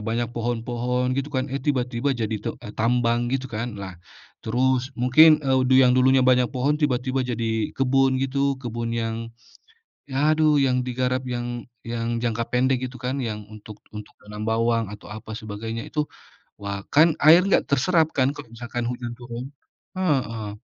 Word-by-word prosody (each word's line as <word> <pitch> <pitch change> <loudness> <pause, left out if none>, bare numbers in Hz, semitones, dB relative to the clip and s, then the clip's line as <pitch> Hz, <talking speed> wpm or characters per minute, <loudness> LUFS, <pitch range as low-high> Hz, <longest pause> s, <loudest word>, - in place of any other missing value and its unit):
banyak 115 +1 -1
pohon-pohon 120 +2 -1
gitu 135 +2 -2
kan, 130 0 -1
eh, 135 - -1
tiba-tiba 130 -2 0
jadi 110 -1 -2
tu - - -3 0.2
tambang 120 +1 +1
gitu 135 0 -1
kan 115 +1 -4
lah 95 -2 -7 0.5
terus 130 +3 0
mungkin, 150 +5 +6
eee, 130 -1 +2 0.2
yang 125 - +5
dulunya 130 +1 +5
banyak 125 -1 +4
pohon 145 +4 +1
tiba-tiba 130 -2 0
jadi 115 -2 -2
kebun 135 0 +2
gitu 140 +1 0
kebun 115 0 -3
yang, 115 -1 -2 0.9
ya 150 +4 +2
aduh 155 -2 +4
yang 125 -2 +2
digarap 130 +1 -1
yang 120 -1 -4 0.2
yang 115 0 -2
jangka 115 -1 -1
pendek 130 +1 +2
gitu 125 0 -6
kan 130 +1 -2
yang 105 -2 -4
untuk 110 -1 -12 0.2
untuk 105 - -9
menanam 105 0 -7
bawang 115 0 +1
atau 105 - -11
apa 110 +1 -8
sebagainya 110 +1 -5
itu, 150 -1 -1 0.6
wah 100 -1 -4
kan 160 +2 +6
air 165 +5 +7
nggak 195 - +2
terserap 160 +4 +3
kan 135 +1 +3
kalau 145 -5 -10
misalkan 120 +1 -5
hujan 120 -1 -4
turun, 120 0 -7 0.5
heeh. 115 - -1
125 Hz, 160 wpm, -24 LUFS, 115-135 Hz, 0.9 s, air